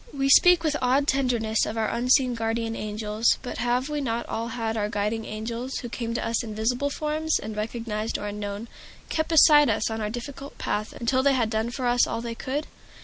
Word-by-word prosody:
We 275 -1 0
speak 355 +4 +7
with 305 -2 +1
awed 265 +3 +2
tenderness 240 -6 +1
of 220 - -3
our 220 -1 +1
unseen 250 +1 +2
guardian 225 0 -2
angels, 215 +1 0
but 250 - -5
have 245 +2 0
we 300 -1 -2
not 235 -3 -2
all 230 +1 -3
had 225 -1 -3
our 210 -1 -1
guiding 210 +2 -2
angels, 230 +4 -5
who 240 - -5
came 230 -1 -4
to - - -2
us 230 0 0
in 215 -2 -6
visible 245 +6 0
form, 305 +2 -3 0.2
and, 215 0 -6
recognized 220 0 -3
or - - -6
unknown, 205 +1 -5 0.4
kept 315 0 -1
beside 300 -3 +7
us 220 +1 0
on 220 0 -3
our 210 - -1
difficult 270 +4 -7
path 210 +1 -2
until 255 +2 +1
they 280 +1 +3
had 230 -3 0
done 220 +1 0
for 250 +1 -4
us 245 0 +3
all - - -3
they 230 0 -4
could? 275 +6 -3
235 Hz, 210 wpm, -25 LUFS, 220-265 Hz, 0.4 s, speak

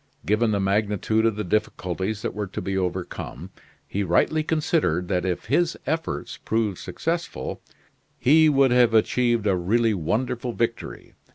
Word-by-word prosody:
Given 110 +5 +2
the 105 -2 +1
magnitude 105 +2 +1
of 110 - 0
the 105 - -3
difficulties 95 +1 -2
that - - -2
were 105 -1 -3
to 95 - -6
be 95 -1 -3
overcome, 90 -2 -4 0.4
he 100 - -2
rightly 100 - +2
considered 150 - 0
that 90 -1 0
if 90 -2 -2
his 165 +8 +1
efforts 160 +4 -3
proved 110 -4 -1
successful, 165 - -4 0.6
he 155 +5 +5
would 135 -3 +4
have 120 -2 +4
achieved 120 0 +2
a 100 -2 +3
really 110 +6 +2
wonderful 120 +7 -2
victory. 115 0 -3
110 Hz, 150 wpm, -24 LUFS, 95-125 Hz, 0.6 s, he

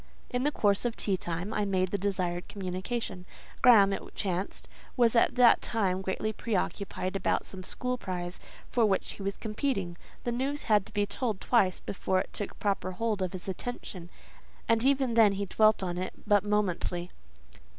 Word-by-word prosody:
In 245 - 0
the 295 +3 +2
course 200 -7 +2
of 240 -2 -1
tea 195 - 0
time 175 +3 -3
I 210 - 0
made 185 -2 0
the 200 - +1
desired 180 -3 -2
communication. 190 +1 -4 0.4
Graham, 210 -6 +7
it - - -3
chanced, 190 -1 -3 0.3
was 240 -1 +4
at 230 - +4
that 250 -2 +6
time 190 -5 0
greatly 195 +3 -2
preoccupied 195 -2 -2
about 195 - 0
some 190 - -8
school 250 +6 -1
prize, 180 -3 -4 0.3
for 240 - +1
which 195 -2 0
he - - -10
was 195 0 -3
competing. 215 -5 -2 0.3
The 240 - -1
news 270 +4 -1
had 210 -4 +3
to - - -12
be 205 0 +1
told 215 -1 -2
twice 195 -7 +2
before 190 -1 -1
it - - -5
took 205 - -5
proper 195 -2 -1
hold 215 0 -1
of 185 -2 -1
his 185 0 -7
attention, 185 -3 -6 0.6
and 230 0 +3
even 265 -2 +2
then 220 -3 +6
he 200 +1 -2
dwelt 215 +1 +3
on 175 -1 -2
it 185 - -3
but 205 -2 +4
momently. 180 -4 -1
200 Hz, 180 wpm, -29 LUFS, 185-230 Hz, 0.6 s, Graham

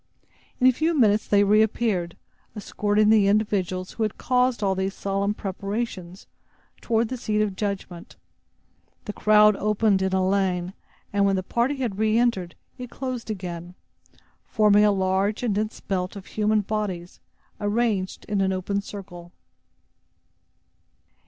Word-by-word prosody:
In 255 - +2
a 255 - +8
few 315 +6 0
minutes 215 -4 +3
they 205 0 +4
reappeared, 210 -4 +1 0.4
escorting 210 0 +1
the 215 -2 +5
individuals 195 -3 0
who - - -8
had 215 -2 -1
caused 250 -3 +1
all 195 -1 +2
these 190 +1 -2
solemn 200 +1 -1
preparations 195 -2 -5 0.6
toward 225 -1 0
the 255 - -4
seat 215 -3 -1
of 210 -3 0
judgment. 195 -4 -5 0.9
The 210 - -5
crowd 210 0 +5
opened 210 -1 +1
in 190 0 0
a 190 0 +1
lane; 185 -2 0 0.4
and 200 0 +2
when 195 - +2
the 185 - -2
party 240 +8 0
had 235 -7 -3
re 220 0 +2
entered, 215 -8 0 0.2
it 250 -1 -7
closed 255 -3 -5
in 215 - -1
again, 175 -1 -7 0.7
forming 210 -1 +4
a 210 - +4
large 195 +3 0
and 230 -4 +1
dense 215 +2 -2
belt 185 -1 -3
of 195 -1 -9
human 215 0 +1
bodies, 195 -4 -4 0.4
arranged 205 -2 -1
in 205 -2 -1
an 190 0 +1
open 190 +2 -2
circle. 185 -4 -10
205 Hz, 145 wpm, -24 LUFS, 190-215 Hz, 0.9 s, a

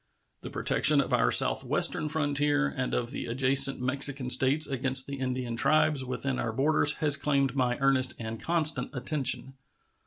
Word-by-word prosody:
The - - -9
protection - - +2
of - - -3
our - - +1
southwestern 155 - +1
frontier 145 -1 -1
and 130 -2 -5
of 120 0 -4
the - - -7
adjacent 135 +3 +3
Mexican 130 0 0
States 140 +5 +2
against 130 -1 +2
the 140 -1 -8
Indian 130 -2 -5
tribes 155 +2 0
within 130 +1 -5
our 115 - -4
border 145 +6 -1
has 150 -2 +3
claimed 140 -3 -2
my 125 -2 -1
earnest 135 -2 0
and 110 -1 -8
constant 165 -2 0
attention. 135 0 -1
135 Hz, 155 wpm, -26 LUFS, 130-145 Hz, -, adjacent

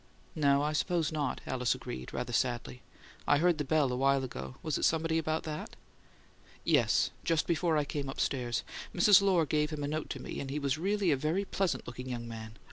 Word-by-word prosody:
"No, 140 -2 +3
I 150 +1 0
suppose 165 0 0
not," 150 -3 -2
Alice 125 -2 0
agreed, 65 0 -7
rather 120 - -4
sadly. 120 0 -1 0.5
"I 145 - +5
heard 170 +1 +3
the - - +1
bell 145 -2 +2
awhile 135 +2 +2
ago. 65 - -6
Was 155 -3 -1
it - - -4
somebody 160 0 +2
about 155 0 -1
that?" 155 -1 -6 0.9
"Yes; - - +3
just 165 -2 +1
before 170 -1 +1
I 150 - +1
came 140 -1 -3
upstairs. 125 -3 -1 0.3
Mrs. 195 +2 +7
Lohr 185 -5 +3
gave 150 0 +1
him 150 -2 -4
a - - -1
note 155 +1 -3
to - - -4
me, - - -6
and 135 - -5
he 140 - -2
was 140 0 0
really 195 0 +1
a - - +4
very 160 +8 0
pleasant 190 -2 -1
looking 125 +1 -7
young 120 -2 -4
man. 110 -1 -8
150 Hz, 205 wpm, -31 LUFS, 130-160 Hz, 0.9 s, Mrs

